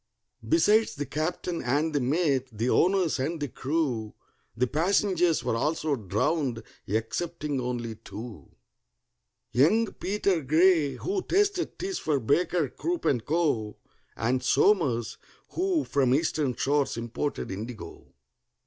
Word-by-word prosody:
Besides 225 -9 +4
the 145 - -3
captain 165 +4 -3
and 145 +6 0
the 145 - +2
mate, 135 -1 +1
the 115 +3 -1
owners 180 -6 +2
and 155 +5 -2
the 145 - -2
crew, 130 -8 -2 0.4
The 125 - +3
passengers 175 - +1
were - - 0
also 150 +3 0
drowned 115 - -1 0.2
excepting 145 - -2
only 120 -2 -3
two: 110 +1 -10 1.0
Young 195 - +3
PETER 195 -3 0
GRAY, 155 +1 +3
who 385 0 -2
tasted 395 -1 0
teas 380 0 -3
for 150 -3 0
BAKER, 155 +4 +1
CROOP, 345 - -3
AND 120 -5 +1
CO., 145 -10 0 0.4
And 125 +4 0
SOMERS, 130 - +2 0.3
who 360 -4 0
from 130 -2 +2
Eastern 150 -4 0
shores 140 -3 0
imported 120 +4 -3
indigo. 110 +4 -8
145 Hz, 120 wpm, -27 LUFS, 125-175 Hz, 1.0 s, Besides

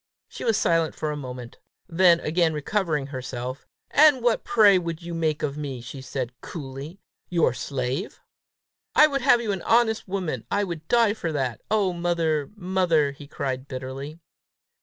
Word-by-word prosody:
She - - -8
was 225 -3 +2
silent 165 -5 +1
for 155 - -2
a - - -3
moment. 125 -4 -8 0.3
Then 175 -1 +5
again 160 0 +1
recovering 155 -2 -1
herself, 130 -1 -6 0.2
"And 290 -4 +6
what, 240 -2 +2
pray, 205 -5 +5
would 170 -1 -5
you 170 0 -6
make 160 -2 -1
of 145 0 -2
me?" 140 -4 -4
she 125 +3 -8
said 130 -1 -4
coolly. 145 +3 -8 0.3
"Your 170 -2 +2
slave?" 130 -1 -3 0.8
"I 305 - +8
would 275 -3 0
have 245 -2 +5
you 220 -3 -1
an 190 -3 -3
honest 225 -2 +2
woman! 170 - -3
I 205 - +1
would 165 -4 -6
die 230 -3 +4
for 170 -7 -3
that! 130 -5 -2
Oh, 200 -4 +2
mother! 165 -4 0
mother!" 180 -6 +1
he 140 +1 -12
cried 135 -2 -4
bitterly. 135 +3 -6
160 Hz, 165 wpm, -25 LUFS, 135-190 Hz, 0.8 s, I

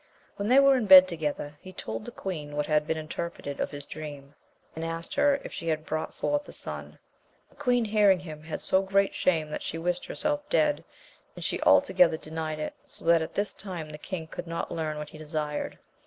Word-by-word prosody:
When 200 - -3
they 255 +4 +7
were 275 -1 +6
in 230 -4 -1
bed 185 -1 +11
together, 150 -3 -4
he 185 - -10
told 110 -10 -5
the - - -6
queen 150 -6 -5
what 150 0 0
had 150 -1 +1
been 160 0 0
interpreted 155 -2 -5
of - - 0
his 145 -1 -7
dream, 145 -2 -8 0.4
and 160 - -4
asked 165 0 -4
her 280 -1 +3
if - - -8
she 165 - -5
had 155 -1 0
brought 155 0 -2
forth 290 0 -1
a - - -7
son. - - -2 0.5
The - - -23
queen 245 -4 +2
hearing 205 -3 +4
him, 155 -4 -8
had 155 0 -5
so 190 - +3
great 195 0 +2
shame 160 -4 +1
that - - -3
she 165 - -4
wished 175 +2 -1
herself 295 0 -2
dead^ 295 -1 +2 0.3
* - - -30
and - - -6
she - - -1
altogether 270 -12 +5
denied 155 0 -4
it, 155 - -4
so - - -14
that 165 0 +5
at 160 - -5
this 205 +1 0
time 180 -6 -6
the 150 - -8
king 170 -1 -5
could 160 - -7
not 165 0 -3
learn 155 -2 -2
what 150 -1 -6
hedesired. 155 -1 -4
165 Hz, 215 wpm, -28 LUFS, 155-195 Hz, 0.5 s, bed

